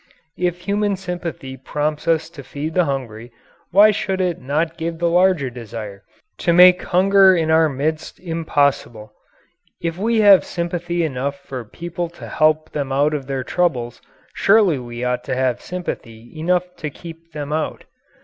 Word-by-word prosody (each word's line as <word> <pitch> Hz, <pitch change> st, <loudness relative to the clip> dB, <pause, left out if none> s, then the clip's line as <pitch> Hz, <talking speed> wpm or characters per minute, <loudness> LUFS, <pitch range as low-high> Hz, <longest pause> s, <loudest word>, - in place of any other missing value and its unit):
If 180 Hz, 0 st, -1 dB
human 205 Hz, +1 st, 0 dB
sympathy 175 Hz, -8 st, -6 dB
prompts 150 Hz, +4 st, -3 dB
us 165 Hz, -1 st, +2 dB
to 160 Hz, -5 st, -10 dB
feed 145 Hz, +4 st, -6 dB
the 180 Hz, 0 st, +3 dB
hungry, 120 Hz, -4 st, -5 dB, 0.4 s
why 205 Hz, +4 st, +6 dB
should 190 Hz, -2 st, -2 dB
it 180 Hz, -3 st, -1 dB
not 155 Hz, +5 st, -1 dB
give 165 Hz, 0 st, -4 dB
the 170 Hz, +1 st, 0 dB
larger 175 Hz, -6 st, +2 dB
desire 110 Hz, -4 st, -8 dB, 0.4 s
to 175 Hz, -, +1 dB
make 180 Hz, +1 st, +7 dB
hunger 190 Hz, +1 st, +5 dB
in 160 Hz, -2 st, 0 dB
our 160 Hz, 0 st, +4 dB
midst 150 Hz, +3 st, -3 dB
impossible? 145 Hz, -10 st, -1 dB, 0.7 s
If 170 Hz, +1 st, -3 dB
we 225 Hz, +2 st, +2 dB
have 200 Hz, -3 st, +7 dB
sympathy 175 Hz, 0 st, -3 dB
enough 140 Hz, -1 st, -2 dB
for 130 Hz, -3 st, -7 dB
people 170 Hz, +8 st, -5 dB
to -, -, -9 dB
help 155 Hz, 0 st, +1 dB
them 140 Hz, -2 st, -3 dB
out 145 Hz, +3 st, +2 dB
of 140 Hz, -3 st, -4 dB
their 135 Hz, -2 st, -3 dB
troubles, 125 Hz, -9 st, -1 dB, 0.3 s
surely 195 Hz, -8 st, +3 dB
we 120 Hz, 0 st, -7 dB
ought 125 Hz, 0 st, -1 dB
to -, -, -2 dB
have 130 Hz, -2 st, 0 dB
sympathy 120 Hz, -10 st, -7 dB
enough 180 Hz, +3 st, -1 dB
to 150 Hz, -, -4 dB
keep 165 Hz, +3 st, -12 dB
them 150 Hz, 0 st, -4 dB
out. 155 Hz, 0 st, -3 dB
160 Hz, 160 wpm, -20 LUFS, 135-180 Hz, 0.7 s, make